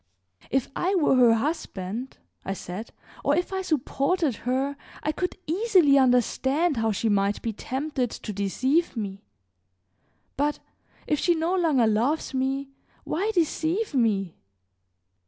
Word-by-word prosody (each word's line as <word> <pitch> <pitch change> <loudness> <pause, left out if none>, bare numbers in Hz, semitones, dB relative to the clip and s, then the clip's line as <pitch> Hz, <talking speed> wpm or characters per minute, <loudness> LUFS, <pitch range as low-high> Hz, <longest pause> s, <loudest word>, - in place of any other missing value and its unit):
"If 265 -1 +1
I 375 +3 +1
were 325 -7 +3
her 240 -3 +6
husband," 230 - -3 0.3
I 195 - -2
said, 195 +4 -7 0.3
"or 285 - +3
if 355 +3 -1
I 380 - -1
supported 300 - 0
her 270 +2 0 0.3
I 305 - +1
could 360 +5 -3
easily 360 -4 +4
understand 265 +5 +2
how 225 0 +1
she 215 +2 -1
might 200 -1 +2
be 225 - -2
tempted 265 +2 -2
to 215 - -6
deceive 260 - 0
me; 200 -3 -4 1.2
but 290 +2 +1 0.5
if 300 - 0
she 345 - +3
no 330 +3 0
longer 310 -10 +3
loves 240 +9 +1
me, 270 +1 -1 0.3
why 390 +7 -1
deceive 340 +4 0
me?" 205 - +1
270 Hz, 135 wpm, -26 LUFS, 225-320 Hz, 1.2 s, her